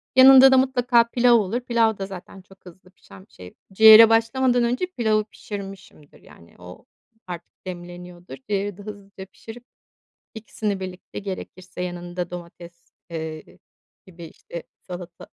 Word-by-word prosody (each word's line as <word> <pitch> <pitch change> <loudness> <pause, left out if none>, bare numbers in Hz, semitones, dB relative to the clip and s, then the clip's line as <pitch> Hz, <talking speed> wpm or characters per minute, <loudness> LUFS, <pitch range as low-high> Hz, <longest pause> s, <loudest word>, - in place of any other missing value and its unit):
Yanında 265 0 +8
da, 265 - +5
mutlaka 245 -2 +3
pilav 245 0 +3
olur. 220 +2 0
Pilav 230 -3 +1
da 195 - -5
zaten 190 0 -11
çok 190 0 -22
hızlı 185 +1 -16
pişen 95 - -17
bir - - -35
şey. 90 0 -13 0.2
Ciğere 220 +2 +9
başlamadan 245 +2 +2
önce, 245 +9 -1
pilavı 220 -10 0
pişirmişimdir. 195 -8 -11
Yani 85 - -19
o 90 0 -13 0.4
artık 175 +1 -11
demleniyordur. 175 0 -10
Ciğeri 200 -1 -2
de - - -12
hızlıca 200 -2 -11
pişirip, 225 +5 -13 0.7
ikisini 210 -2 -5
birlikte, 185 -1 -8
gerekirse 185 -2 -8
yanında 175 0 -6
domates, 170 -1 -12 0.2
eee, 160 -1 -8 0.5
gibi, 175 -2 -13
işte, 170 +1 -10 0.2
salata 175 -1 -10
195 Hz, 135 wpm, -22 LUFS, 175-225 Hz, 0.7 s, Ciğere